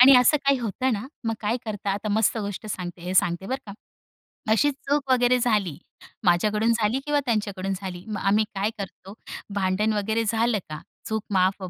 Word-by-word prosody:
आणि 265 +2 +10
असं 250 +5 +6
काही 275 -1 +4
होतं 245 +3 -1
ना 215 +4 -3 0.2
मग 225 - +1
काय 220 +3 0
करता. 205 -2 -3
आता 205 +2 -2
मस्त 220 +2 +2
गोष्ट 205 0 -4
सांगते 180 -4 -5
हे 180 +1 -3
सांगते 175 +1 +2
बरं 260 - -1
का. 200 - -7 0.8
अशी 290 +6 +4
चूक 280 0 -2
वगैरे 250 0 +4
झाली, 210 -9 +1 0.5
माझ्याकडून 210 +6 +3
झाली 225 +2 +1
किंवा 295 0 +2
त्यांच्याकडून 200 -4 -1
झाली. 180 -2 -6
मग 210 -1 -4
आम्ही 210 +2 +3
काय 200 +2 0
करतो. 195 0 -8 0.4
भांडण 200 +2 +1
वगैरे 220 +2 0
झालं 225 0 +2
का 155 0 -6 0.3
चूक 220 -1 -1
माफ 190 +1 +2
210 Hz, 180 wpm, -25 LUFS, 195-235 Hz, 0.8 s, आणि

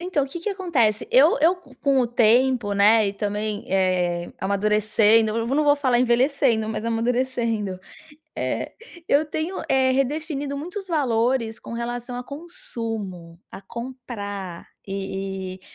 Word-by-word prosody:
Então, 345 -6 0
o - - -9
que 340 +5 -7
que 420 - -2
acontece? 325 - 0
Eu - - +5
eu 345 +4 +4
com 275 -4 -1
o 245 - +2
tempo, 240 -1 +3
né, 210 +1 +5
e - - -3
também, 210 0 -3
eh, 180 -2 0
amadurecendo, 215 +2 +3
eu 230 - -1
não 290 +4 +1
vou 290 0 +5
falar 260 -4 +2
envelhecendo, 245 -2 +2
mas 220 0 -4
amadurecendo, 230 -4 -1 0.6
eh, - - -2 0.4
eu 290 +2 +4
tenho, 315 +5 -3
eh, 265 -1 +4
redefinido 285 +1 -1
muitos 380 +6 -6
valores 245 -6 0
com - - -10
relação 240 +1 -4
a 245 - -4
consumo, 225 - -7
a 195 - -10
comprar 205 -8 -7 0.2
e 195 -1 -4
e, - - -22
235 Hz, 140 wpm, -23 LUFS, 205-275 Hz, 0.6 s, Eu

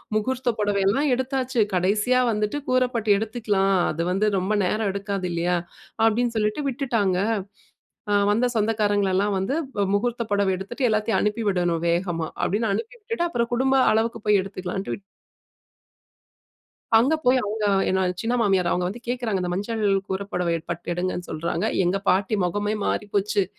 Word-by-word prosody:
முகூர்த்த 245 +3 0
புடவையெல்லாம் 205 +7 +2
எடுத்தாச்சு. 260 -1 -2
கடைசியா 210 +8 +2
வந்துட்டு 210 +4 -1
கூரப்பட்டு 250 -4 +1
எடுத்துக்கலாம். 210 -3 0 0.2
அது 160 - -3
வந்து 195 +3 +1
ரொம்ப 190 +2 -1
நேரம் 215 +3 0
எடுக்காது 200 -2 -3
இல்லயா! 175 +1 0 0.5
அப்பிடின்னு 230 +1 +2
சொல்லிட்டு 215 +7 0
விட்டுட்டாங்க. 235 -8 0 0.9
அ - - +3 0.2
வந்த 230 +4 +2
சொந்தக்காரங்களெல்லாம் 205 -2 +1
வந்து 195 +9 -1 0.3
அ - - +2
முகூர்த்த 235 +3 -1
புடவை 200 -1 +2
எடுத்துட்டு 240 +7 -2
எல்லாத்தையும் 215 +1 +1
அனுப்பி 210 +2 0
விடணும் 175 -3 0
வேகமா, 170 -2 -1
அப்பிடின்னு 210 +2 0
அனுப்பி 225 +4 -4
விட்டுட்டு, 430 -4 -2
அப்புறம் 235 -4 -1
குடும்ப 265 +2 +2 0.2
அளவுக்கு 225 +1 0
போய் 210 -1 +5
எடுத்துக்கலான்ட்டு 190 0 -5
விட் - - -17 2.0
அங்க 255 +7 +3
போய் 255 +1 +5
அவுங்க 210 +1 -2 0.2
என்னோட 185 -1 +1
சின்ன 230 +2 -1
மாமியார் 190 -5 +2
அவுங்க 180 0 0
வந்து 230 +5 -8
கேக்குறாங்க. 240 -6 -1
இந்த 180 -1 -2
மஞ்சள் 215 +4 -2 0.2
கூரபுடவை 190 -3 -2 0.2
பட்டு 170 +1 -5
எடுங்கன்னு 180 0 -3
சொல்றாங்க. 170 +4 -2 0.2
எங்க 180 +3 +1
பாட்டி 195 +3 +2
முகமே 205 +4 -1
மாறி 210 - -1
போச்சு. 200 0 +2
210 Hz, 145 wpm, -24 LUFS, 190-230 Hz, 2.0 s, போய்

